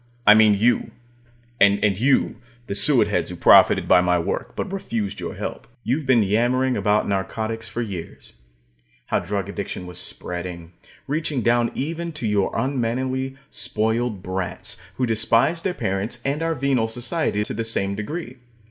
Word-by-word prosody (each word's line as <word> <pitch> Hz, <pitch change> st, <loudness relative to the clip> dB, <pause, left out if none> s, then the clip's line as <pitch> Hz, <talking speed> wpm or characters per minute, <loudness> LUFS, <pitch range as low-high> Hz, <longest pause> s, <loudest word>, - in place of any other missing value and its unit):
I 105 Hz, -, +9 dB
mean 110 Hz, -1 st, +6 dB
you, 115 Hz, +5 st, +2 dB, 0.7 s
and 100 Hz, 0 st, +4 dB, 0.2 s
you 130 Hz, +3 st, +2 dB, 0.3 s
the -, -, -4 dB
suetheads 100 Hz, -, +3 dB
who -, -, -6 dB
profited -, -, +6 dB
by 90 Hz, -, +6 dB
my 90 Hz, 0 st, +2 dB
work, 85 Hz, -, -3 dB
but -, -, -4 dB
refused 110 Hz, -, -3 dB
your -, -, -5 dB
help. -, -, -6 dB, 0.2 s
You've 135 Hz, +4 st, -1 dB
been 120 Hz, -4 st, +5 dB
yammering 120 Hz, +5 st, +1 dB
about 105 Hz, 0 st, +1 dB
narcotics 110 Hz, +3 st, -3 dB
for 120 Hz, -, -3 dB
years 95 Hz, -7 st, -8 dB, 0.7 s
how -, -, 0 dB
drug 100 Hz, +2 st, -3 dB
addiction 100 Hz, -2 st, -5 dB
was 90 Hz, -1 st, -8 dB
spreading, 90 Hz, -1 st, -6 dB, 0.3 s
reaching 150 Hz, -3 st, -2 dB
down 120 Hz, 0 st, +3 dB
even 165 Hz, +4 st, -3 dB
to 150 Hz, -, -5 dB
your 105 Hz, -2 st, +1 dB
unmannerly, 130 Hz, +1 st, -1 dB
spoiled 110 Hz, -2 st, -1 dB
brats, 95 Hz, 0 st, -4 dB
who 130 Hz, -, 0 dB
despise 115 Hz, +8 st, +2 dB
their 180 Hz, 0 st, -2 dB
parents 100 Hz, 0 st, -2 dB
and 140 Hz, +3 st, -1 dB
our 165 Hz, 0 st, 0 dB
venal 130 Hz, -4 st, +1 dB
society 120 Hz, -1 st, -1 dB
to -, -, -4 dB
the 115 Hz, -, -2 dB
same 100 Hz, -3 st, -1 dB
degree. 130 Hz, -, -5 dB
115 Hz, 155 wpm, -22 LUFS, 100-130 Hz, 0.7 s, I